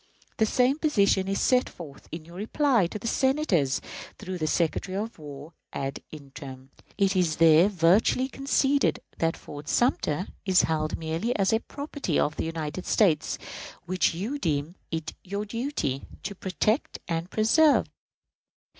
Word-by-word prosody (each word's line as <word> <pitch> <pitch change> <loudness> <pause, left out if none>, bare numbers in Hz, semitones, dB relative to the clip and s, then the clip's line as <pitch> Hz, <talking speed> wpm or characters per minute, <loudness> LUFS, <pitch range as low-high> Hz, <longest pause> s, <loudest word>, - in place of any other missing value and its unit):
The 220 - +3
same 255 +6 +2
position 200 -11 +2
is 195 0 0
set 255 0 +3
forth 150 -6 -12
in 160 -1 -7
your 170 +2 -12
reply 230 - +2
to 195 - -6
the 210 - -10
Senators, 230 - +2 0.4
through 185 -3 -6
the 155 - 0
Secretary 175 +4 0
of 220 -1 -4
War 145 +1 -9 0.2
ad 135 0 -4
interim. 135 -2 -10 0.3
It 195 -1 +2
is 175 -4 +2
there 165 +3 +6
virtually 195 +8 +3
conceded 275 +1 +1 0.2
that 165 0 +1
Fort 145 +1 -9
Sumter 185 - +1 0.2
"is 190 -2 +4
held 155 -1 -1
merely 165 +10 -2
as 195 +1 +2
property 285 - -3
of 150 - +1
the - - -2
United 165 +1 -4
States, 165 -9 +2 0.5
which 185 -2 +1
you 225 +12 -3
deem 150 - -1 0.2
it 160 -1 -4
your 200 +3 -4
duty, 230 - -3 0.2
to 200 - -4
protect 200 - -1
and 165 +1 -2
preserve." 280 +10 +4
185 Hz, 145 wpm, -27 LUFS, 160-225 Hz, 0.5 s, there